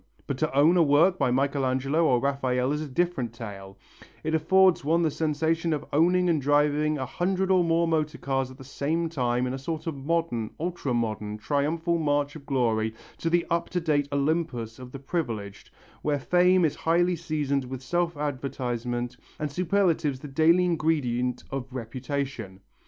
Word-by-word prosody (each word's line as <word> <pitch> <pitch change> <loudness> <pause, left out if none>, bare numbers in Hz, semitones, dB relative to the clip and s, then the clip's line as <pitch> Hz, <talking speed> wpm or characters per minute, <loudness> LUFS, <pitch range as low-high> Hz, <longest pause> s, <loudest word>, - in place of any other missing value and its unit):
But 135 -2 -4
to 155 - 0
own 155 +6 +5
a - - +6
work 165 +5 +4
by - - +2
Michelangelo 135 +3 +1
or 125 -5 +3
Raphael 130 -1 0
is 150 +1 -1
a 155 - -4
different 135 -5 -1
tale; 100 -4 -9 0.5
it 160 - -2
affords 185 +3 +4
one 165 +4 +2
the 160 - +2
sensation 160 +2 0
of 150 0 -3
owning 180 +4 +3
and 160 -4 +2
driving 150 +2 +2
a 130 - -3
hundred 185 +7 -1
or 185 -2 +5
more 165 0 +2
motor 155 -1 0
cars 135 -1 -1
all - - -10
at - - -17
the 135 - -11
same 155 +5 -2
time 125 -5 0
in 125 - -2
a 135 - -4
sort 155 +3 -4
of 165 -3 -3
modern 140 -6 -1
ultra 165 -6 -2
modern 110 -2 -2
triumphal 155 +9 0
march 145 -1 0
of 145 -3 -11
glory 110 -5 0 0.2
to 165 - -1
the 175 0 +2
up 170 0 0
to 180 - -1
date 150 -4 +1
Olympus 140 -6 -1
of 125 -1 -10
the 140 - -7
privileged, 120 - -4 0.3
where 150 -1 0
fame 180 +4 +3
is 150 - +1
highly 175 +2 +2
seasoned 150 -5 -1
with 130 0 -7
self 175 +1 -1
advertisement, 125 -3 -3 0.2
and 150 -2 -3
superlatives 170 -5 +1
the 145 - -8
daily 160 +6 +4
ingredient 130 -8 0
of 135 -1 -5
reputation. 125 -4 -5
145 Hz, 180 wpm, -26 LUFS, 130-165 Hz, 0.5 s, a